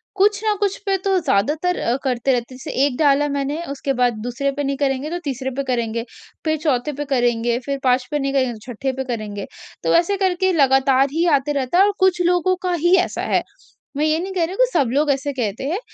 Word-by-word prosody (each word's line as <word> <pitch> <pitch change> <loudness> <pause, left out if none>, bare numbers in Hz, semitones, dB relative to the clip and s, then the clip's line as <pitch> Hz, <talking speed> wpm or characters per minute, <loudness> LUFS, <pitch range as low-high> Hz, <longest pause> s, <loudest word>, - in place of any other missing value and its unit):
कुछ 400 +1 +3
न 425 - +3
कुछ 400 -1 0
पे 390 -1 +2
तो 385 -1 +3
ज़्यादातर 305 - 0
अ, 235 - 0
करते 260 0 0
रहते 240 +1 -2
हैं - - -10
जैसे 285 +3 -7
1 255 -4 -2
डाला 290 -1 +3
मैंने 285 +3 -2
उसके 275 0 -2
बाद 245 -1 +2
दूसरे 260 +3 -1
पे 285 +1 -3
नहीं 275 0 -1
करेंगे, 275 +1 -1
तो 350 +1 -3
तीसरे 265 -2 -3
पे 275 - 0
करेंगे 230 -2 -1 0.4
फ़िर 315 0 +1
चौथे 295 -2 0
पे 290 - -3
करेंगे, 240 -3 +1
फ़िर 275 +1 -4
5 250 0 +2
पे 295 - 0
नहीं 275 0 -1
करेंगे 255 -3 +1
तो 240 +3 -9
छठे 265 +4 -2
पे 265 +1 -3
करेंगे। 215 -5 -5 0.4
तो - - +2
ऐसे 350 +4 +2
करके 375 -1 +1
लगातार 270 -2 +4
ही 335 +2 +1
आते 295 +2 -3
रहता 275 +5 0
हैं 395 - +7
और 410 - +2
कुछ 375 -1 +3
लोगों 360 +1 +2
का 365 - 0
ही 345 +2 +3
ऐसा 360 - -1
है, - - +1 0.5
मैं 300 - +1
ये 310 +1 +2
नहीं 380 +2 -4
कह 350 -3 +1
रही 350 - -7
हूँ 385 - -6
कि - - -8
सब 260 -5 +2
लोग 295 +1 +2
ऐसे 275 +1 -1
कहते 230 -2 -3
हैं 370 +6 -1
280 Hz, 240 wpm, -20 LUFS, 255-340 Hz, 0.5 s, हैं